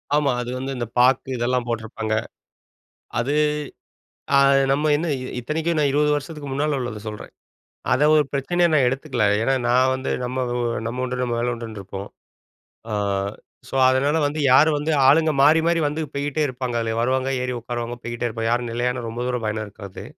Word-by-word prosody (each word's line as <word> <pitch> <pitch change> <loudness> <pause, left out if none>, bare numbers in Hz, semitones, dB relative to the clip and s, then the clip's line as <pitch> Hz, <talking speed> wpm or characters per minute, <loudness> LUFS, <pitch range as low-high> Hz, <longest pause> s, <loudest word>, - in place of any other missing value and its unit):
ஆமா. 145 -2 +2
அது 120 - -5
வந்து 135 +1 -4
இந்த 120 -2 -3
பாக்கு 130 +1 +3
இதெல்லாம் 125 +1 0
போட்டிருப்பாங்க. 110 -1 -3 1.0
அது 135 +5 0 1.0
அ - - +7 0.3
நம்ம 150 +2 +2
என்ன 165 +3 -2
இ - - -5 0.2
இத்தனைக்கும் 160 +6 -1
நான் 145 -2 +3
20 150 +1 +2
வருஷத்துக்கு 145 0 -6
முன்னால 145 +1 0
உள்ளத 120 -4 -4
சொல்றேன். 105 0 -8 0.6
அதை 135 +4 +3
ஒரு 150 -1 +4
பிரச்சனையா 175 +5 +1
நான் 140 -4 +4
எடுத்துக்கல. 130 -3 -1 0.2
ஏன்னா 135 +3 +2
நான் 130 +2 +4
வந்து 130 0 -3
நம்ம, 125 +1 -3 0.5
நம்ம 125 +2 -3
உண்டு 125 0 -3
நம்ம 120 -2 -1
வேல 120 0 0
உண்டுன்னு 115 -3 -7
இருப்போம். 95 +1 -7 0.8
அ - - 0 0.7
ஸோ, - - -9
அதனால 135 +4 +2
வந்து 150 +2 -2
யாரும் 150 +3 +5
வந்து 150 +2 -1 0.2
ஆளுங்க 155 +2 +5
மாறி, 150 +3 +6
மாறி 170 0 +2
வந்து 150 +2 -2
போயிட்டே 145 +2 -2
இருப்பாங்க. 125 -2 -4
அதுல 115 -1 -2
வருவாங்க, 130 +2 +1
ஏறி 125 0 -2
உட்காருவாங்க, 120 0 -4
போயிக்கிட்டே 120 +1 -3
இருப்பாங்க 115 0 -2
யாரும் 120 -1 -1
நிலையானா 120 0 -1
ரொம்ப 120 +2 -4
தூரம் 125 -3 -2
பயணம் 110 0 -2
இருக்காது. 100 -1 -10
130 Hz, 170 wpm, -22 LUFS, 120-145 Hz, 1.0 s, அ